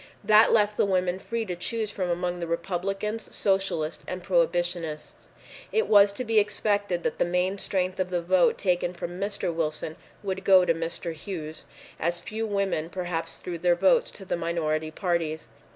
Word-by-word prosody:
That 215 Hz, +2 st, +6 dB
left 210 Hz, -1 st, +3 dB
the -, -, +4 dB
women 185 Hz, -1 st, +1 dB
free 230 Hz, +2 st, -3 dB
to 180 Hz, -3 st, -4 dB
choose 215 Hz, +4 st, -3 dB
from 185 Hz, -3 st, -2 dB
among 175 Hz, 0 st, -1 dB
the 170 Hz, -, -3 dB
Republicans, 195 Hz, +5 st, -3 dB
Socialists 190 Hz, -5 st, 0 dB
and 180 Hz, -1 st, -5 dB
Prohibitionists. 175 Hz, -3 st, -1 dB, 0.4 s
It 445 Hz, -, +2 dB
was 205 Hz, -1 st, +6 dB
to 255 Hz, -, -4 dB
be 225 Hz, -2 st, +3 dB
expected 205 Hz, -3 st, 0 dB
that -, -, -2 dB
the -, -, +4 dB
main 180 Hz, +3 st, 0 dB
strength 185 Hz, -1 st, -1 dB
of 185 Hz, -1 st, 0 dB
the 180 Hz, -1 st, 0 dB
vote 175 Hz, +1 st, +3 dB
taken 180 Hz, -1 st, 0 dB
from 175 Hz, +1 st, -6 dB
Mr. 200 Hz, -3 st, -1 dB
Wilson 155 Hz, -1 st, -2 dB, 0.3 s
would 190 Hz, -1 st, -3 dB
go 190 Hz, -2 st, +6 dB
to 170 Hz, -, +3 dB
Mr. 165 Hz, +1 st, -3 dB
Hughes, 160 Hz, -2 st, -7 dB, 0.3 s
as 170 Hz, +2 st, 0 dB
few 220 Hz, +5 st, -4 dB
women 195 Hz, -6 st, -1 dB
perhaps 175 Hz, -2 st, -3 dB
threw 175 Hz, -2 st, -6 dB
their 175 Hz, +1 st, +3 dB
votes 190 Hz, +2 st, +3 dB
to 195 Hz, -, -11 dB
the 185 Hz, -, -1 dB
minority 160 Hz, -2 st, -1 dB
parties. 165 Hz, -2 st, -2 dB
180 Hz, 175 wpm, -27 LUFS, 170-200 Hz, 0.4 s, That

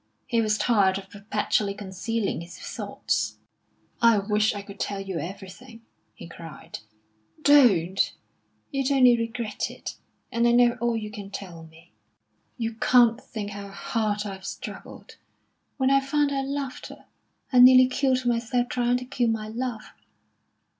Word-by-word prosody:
He 230 Hz, -1 st, +1 dB
was 215 Hz, -1 st, +1 dB
tired 200 Hz, -6 st, +3 dB
of 195 Hz, 0 st, -10 dB
perpetually 205 Hz, 0 st, -1 dB
concealing 200 Hz, 0 st, -3 dB
his 170 Hz, +1 st, -10 dB
thoughts. -, -, -3 dB, 0.6 s
"I 230 Hz, -2 st, +6 dB
wish 210 Hz, +1 st, +1 dB
I 200 Hz, -, -5 dB
could 200 Hz, 0 st, -12 dB
tell 200 Hz, -1 st, -2 dB
you 195 Hz, -3 st, -4 dB
everything!" 195 Hz, -, -9 dB, 0.3 s
he -, -, -10 dB
cried. 165 Hz, -1 st, -10 dB, 0.6 s
"Don't! 200 Hz, -, +4 dB, 0.6 s
You'd 275 Hz, -1 st, -1 dB
only 255 Hz, -3 st, +6 dB
regret 230 Hz, -1 st, -3 dB
it. -, -, -8 dB, 0.3 s
And 235 Hz, 0 st, +2 dB
I 235 Hz, -, +4 dB
know 240 Hz, 0 st, +5 dB
all 235 Hz, -1 st, +1 dB
you 210 Hz, -1 st, -5 dB
can 205 Hz, -1 st, -8 dB
tell 180 Hz, -5 st, -8 dB
me." 165 Hz, +2 st, -20 dB, 0.7 s
"You 230 Hz, -2 st, -2 dB
can't 240 Hz, +1 st, +4 dB
think 205 Hz, -3 st, -6 dB
how 200 Hz, 0 st, -7 dB
hard 210 Hz, +1 st, -2 dB
I've 195 Hz, -2 st, -7 dB
struggled. -, -, -9 dB, 0.6 s
When 265 Hz, -1 st, +2 dB
I 275 Hz, -, +5 dB
found 285 Hz, +1 st, 0 dB
I 275 Hz, -1 st, 0 dB
loved 275 Hz, -1 st, -4 dB
her, -, -, -13 dB, 0.5 s
I 250 Hz, -, +6 dB
nearly 255 Hz, +1 st, +9 dB
killed 255 Hz, 0 st, 0 dB
myself 240 Hz, +1 st, 0 dB
trying 245 Hz, 0 st, +1 dB
to 250 Hz, -, -7 dB
kill 245 Hz, -2 st, 0 dB
my 215 Hz, -1 st, -2 dB
love. 235 Hz, -1 st, -4 dB
225 Hz, 150 wpm, -25 LUFS, 200-250 Hz, 0.7 s, nearly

